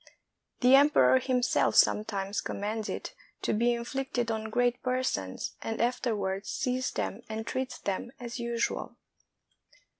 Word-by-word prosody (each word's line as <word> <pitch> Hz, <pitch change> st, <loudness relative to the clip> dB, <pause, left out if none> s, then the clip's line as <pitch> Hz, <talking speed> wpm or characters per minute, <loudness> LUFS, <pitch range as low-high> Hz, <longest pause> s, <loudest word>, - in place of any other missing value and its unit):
The 250 Hz, +1 st, +6 dB
emperor 285 Hz, -2 st, +6 dB
himself 255 Hz, -1 st, +1 dB
sometimes 200 Hz, -1 st, +2 dB
commands 210 Hz, +2 st, -3 dB
it -, -, -5 dB, 0.3 s
to -, -, +1 dB
be 235 Hz, +3 st, +3 dB
in 235 Hz, -, -4 dB
flicted 245 Hz, -2 st, -2 dB
on 220 Hz, 0 st, -3 dB
great 245 Hz, +2 st, +1 dB
persons, 250 Hz, -, -2 dB
and 225 Hz, 0 st, -3 dB
afterwards 215 Hz, -5 st, -1 dB
sees 255 Hz, -1 st, -1 dB
them -, -, -3 dB
and 220 Hz, 0 st, -4 dB
treats 260 Hz, 0 st, -3 dB
them 200 Hz, +4 st, -3 dB
as 240 Hz, 0 st, -6 dB
usual. 235 Hz, 0 st, -2 dB
235 Hz, 130 wpm, -29 LUFS, 220-255 Hz, 0.3 s, The